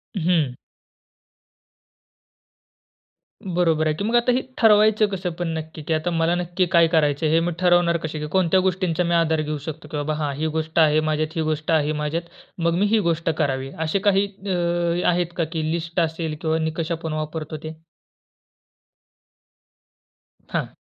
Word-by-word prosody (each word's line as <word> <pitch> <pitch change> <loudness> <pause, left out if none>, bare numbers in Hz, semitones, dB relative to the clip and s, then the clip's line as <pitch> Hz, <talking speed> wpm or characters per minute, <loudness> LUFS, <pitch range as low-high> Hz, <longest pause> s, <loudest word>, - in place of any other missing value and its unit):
हम्म. 165 -8 +1 2.9
बरोबर 170 -3 +1
आहे. 155 - +2
की 200 - -4
मग 230 +3 0
आता 240 +1 +4
हे 255 +2 +1 0.2
ठरवायचं 215 -1 +5
कसं 190 -3 -3
पण 175 - -1
नक्की 160 0 -7
की 160 - -1
आता 160 +3 -1
मला 165 +1 +1
नक्की 175 +1 0
काय 170 -1 +6
करायचंय, 150 -1 +2
हे 160 +2 +4
मी 170 +1 -1
ठरवणार 175 -1 +3
कसे? 155 0 -4
की 150 - -4
कोणत्या 185 0 +3
गोष्टींचा 180 -2 0
मी 170 0 0
आधार 160 -2 +2
घेऊ 150 0 -3
शकतो 160 +1 -7
की, 150 - -5
"बाबा 150 +1 -1
हां, 145 - -1
ही 155 +2 -1
गोष्ट 160 +1 -1
आहे 155 -1 +5
माझ्यात, 155 +1 -1
ही 160 - 0
गोष्ट 155 +1 -2
आहे 155 -1 +2
माझ्यात. 160 +3 -2 0.4
मग 170 0 +1
मी 205 - +3
ही 225 - +5
गोष्ट 165 0 -1
करावी." 135 -2 -1 0.2
असे 175 +5 0
काही 200 0 +4
अ, 175 -3 -1
आहेत 175 -1 0
का, 170 - +2
की 160 0 -3
लिस्ट 170 +1 -2
असेल 160 -1 -1
किंवा 160 0 +1
निकष 160 +1 -2
आपण 165 -1 -3
वापरतो 155 0 -4
ते? 155 0 -7 2.7
हां. - - -1
165 Hz, 165 wpm, -23 LUFS, 155-180 Hz, 2.9 s, काय